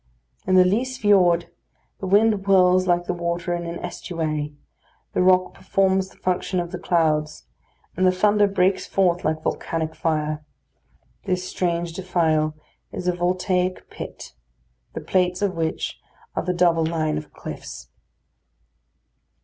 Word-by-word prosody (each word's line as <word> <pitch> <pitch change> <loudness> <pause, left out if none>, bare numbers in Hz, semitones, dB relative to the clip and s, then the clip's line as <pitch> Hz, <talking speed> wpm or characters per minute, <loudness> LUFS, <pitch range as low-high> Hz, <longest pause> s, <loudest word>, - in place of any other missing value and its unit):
In 185 - +3
the 185 0 +7
Lyse 250 +7 0
Fiord, 180 -6 +3 0.5
the 190 - -4
wind 215 +4 +5
whirls 185 -1 +5
like 175 0 +2
the - - -1
water 170 0 -2
in 170 -1 -3
an 170 0 -4
estuary; 155 -4 -4 0.6
the - - +1
rock 185 0 +4
performs 190 -1 +1
the - - -21
function 185 0 -1
of 175 -1 -4
the - - -5
clouds; 155 -3 0 0.5
and 185 +1 +3
the - - +5
thunder 205 +2 +3
breaks 195 -1 +1
forth 180 -2 +1
like 155 0 -1
volcanic 160 -1 -2
fire. 155 -2 -1 0.8
This 185 -1 -1
strange 170 -2 -1
defile 160 -4 0 0.4
is 180 - -5
a 180 - +3
voltaic 180 +1 -1
pile; - - -8 0.6
the - - -5
plates 180 0 0
of 200 -2 +1
which 160 -1 -2 0.4
are - - 0
the 180 - -1
double 170 -2 +3
line 155 -2 0
of 150 - -13
cliffs. - - -9
180 Hz, 140 wpm, -23 LUFS, 165-185 Hz, 0.8 s, the